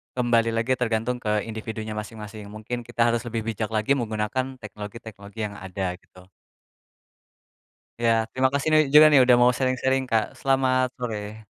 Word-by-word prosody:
kembali 115 -2 +2
lagi 115 +3 0
tergantung 120 +1 -1
ke 105 -3 -1
individunya 110 -1 -6
masing-masing. 105 -1 -7
Mungkin 110 +3 -6
kita 120 0 +2
harus 120 +1 -2
lebih 115 -1 -3
bijak 110 0 -3
lagi 110 +4 0
menggunakan 120 +1 -1
teknologi-teknologi 105 -1 -10
yang 105 0 -5
ada, 95 -1 -4
gitu. 90 +1 -19 1.8
Ya 115 -1 +2
terima 130 0 +2
kasih 140 +2 0
nih 155 0 +6
juga 155 +1 +10
nih, 145 -3 +6
udah 125 -1 +6
mau 125 - +6
sharing-sharing 130 +1 0
Kak, 110 -2 0
selamat 130 -1 +2
sore. 110 -2 -5
115 Hz, 150 wpm, -24 LUFS, 105-125 Hz, 1.8 s, juga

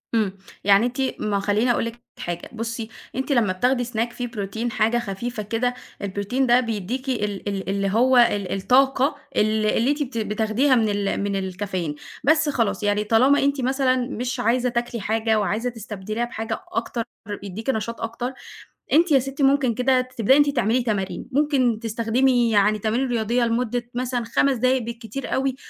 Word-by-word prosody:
إمم. 200 -3 0 0.3
يعني 200 +3 +5
أنتِ 250 +2 -2 0.2
ما 210 -1 -1
أهو 200 - +1
خلّيني 210 +5 +2
اقول 235 - 0
لِك 230 +1 -6 0.2
حاجة، 175 0 -5
بُصّي، 230 0 -4 0.3
أنتِ 265 +2 -2
لمّا 220 -8 +3
بتاخدي 245 +5 +1
snack 235 0 -2
فيه 245 -1 -4
بروتين 225 +1 -4
حاجة 220 +2 +2
خفيفة 215 +1 -4
كده، 235 +4 -1 0.3
البروتين 205 +7 -1
ده 245 +1 +6
بيدّيكِ 235 +3 -3
ال 210 -5 -2
ال 195 -1 -4
اللي 195 0 0
هو 250 +5 +4
ال 205 -5 +3
الطاقة 265 +6 +3 0.2
ال 215 0 +2
اللي 230 +5 +2
أنتِ 295 +1 -2
بت 250 -3 -7
بتاخديها 220 +5 +1
من 220 -3 +2
ال 200 -1 -1
من 200 -1 -1
الكافيين، 185 -4 -3 0.3
بس 305 +2 +3
خلاص 215 -7 0
يعني 205 0 +1
طالما 245 +7 +4
أنتِ 280 -1 +1
مثلًا 260 0 +2
مش 250 0 -3
عايزة 245 +2 +2
تاكلي 240 -2 -2
حاجة 220 +1 +1
وعايزة 215 +5 -1
تستبدليها 215 0 -4
بحاجة 225 -1 -4
أكتر 240 -9 -2 0.4
يدّيكِ 205 +6 -6
نشاط 230 -1 -2
أكتر، 235 +3 -3 0.6
أنتِ 330 +1 +4
يا 275 - +6
ستي 270 +2 -3
ممكن 270 -3 +3
كده 255 +1 +3
تبدئي 255 -1 +2
إن 290 - +7
أنتِ 285 - -2
تعملي 235 +4 +2
تمارين، 200 -3 -2
ممكن 260 -5 +2
تستخدمي 235 +2 +1
يعني 210 +1 +3
تمارين 230 +5 0
رياضية 235 +1 +1
لمدة 240 +1 -1
مثلًا 250 -1 -1
5 260 +3 +2
دقايق 255 +2 +2
بالكتير 235 +3 -6
أوي، 265 -1 0
235 Hz, 175 wpm, -23 LUFS, 210-255 Hz, 0.6 s, إن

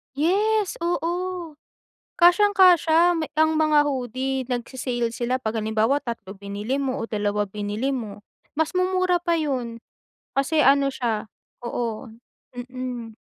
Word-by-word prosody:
Yes, 405 +6 +1
oo. 350 -1 -2 0.6
Kasyang-kasya 355 -2 +5 0.2
ang 315 0 +4
mga 305 -1 +4
hoodie, 260 0 -2
nagse-sale 245 -1 -2
sila 250 +2 -1
pag 220 -2 -3
halimbawa 220 +5 +1
3 210 -5 -6
binili 205 +5 -4
mo 270 -1 -2
o 230 - -4
2 205 -1 -1
binili 210 +6 -3
mo. 215 -5 -6 0.4
Mas 320 +1 0
mumura 365 -1 +2
pa 340 - +1
yun. 250 -6 -3 0.6
Kasi 300 +3 +2
ano 275 0 +5
siya 225 -4 -2 0.4
oo, 235 0 -4 0.5
mm. 245 -2 -6
260 Hz, 115 wpm, -24 LUFS, 230-330 Hz, 0.6 s, Kasyang-kasya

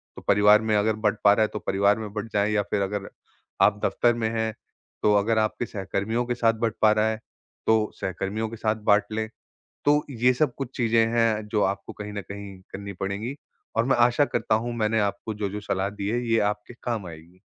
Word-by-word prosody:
तो - - -9
परिवार 105 +1 +6
में 110 -1 +1
अगर 105 +1 +2
बँट 110 0 0
पा 100 - +7
रहा 105 - +1
है - - +2
तो 105 - -3
परिवार 100 +2 +2
में 105 -2 -6
बँट 105 +1 -5
जाए 105 +1 +2
या 105 -1 +2
फिर 100 - +1
अगर 100 0 -3 0.5
आप 105 0 +4
दफ्तर 120 0 +2
में 110 -1 -1
हैं, 110 -1 -1 0.5
तो 105 - +5
अगर 110 +2 +2
आपके 110 +2 0
सहकर्मियों 110 +3 -2
के 120 0 -2
साथ 115 -1 +3
बँट 115 -1 -2
पा 110 - +6
रहा 110 +1 +2
है, 110 0 -3 0.5
तो 110 -1 +3
सहकर्मियों 100 +4 -2
के 115 - -7
साथ 110 0 0 0.2
बाँट 105 0 +4
लें। 110 0 -2 0.6
तो 150 +1 +4
ये 125 0 +3
सब 130 -1 +1
कुछ 135 -2 -6
चीज़ें 115 -2 +3
हैं 110 -2 +2
जो 105 -1 +1
आपको 100 +1 -2
कहीं 105 0 -7
न 100 - -3
कहीं 100 -1 -8
करनी 100 0 -6
पड़ेंगी 105 +7 -3 0.4
और 115 - +3
मैं 135 -1 +3
आशा 125 +4 +2
करता 110 - 0
हूँ 120 +2 -1
मैंने 110 0 +1
आपको 100 +2 -2
जो-जो 105 0 -3
सलाह 100 -1 -1
दी 100 0 -4
है 120 +3 0
ये 115 0 +3
आपके 105 +3 -13
काम 115 -6 -2
आएगी। 85 +3 -13
110 Hz, 220 wpm, -25 LUFS, 100-115 Hz, 0.6 s, पा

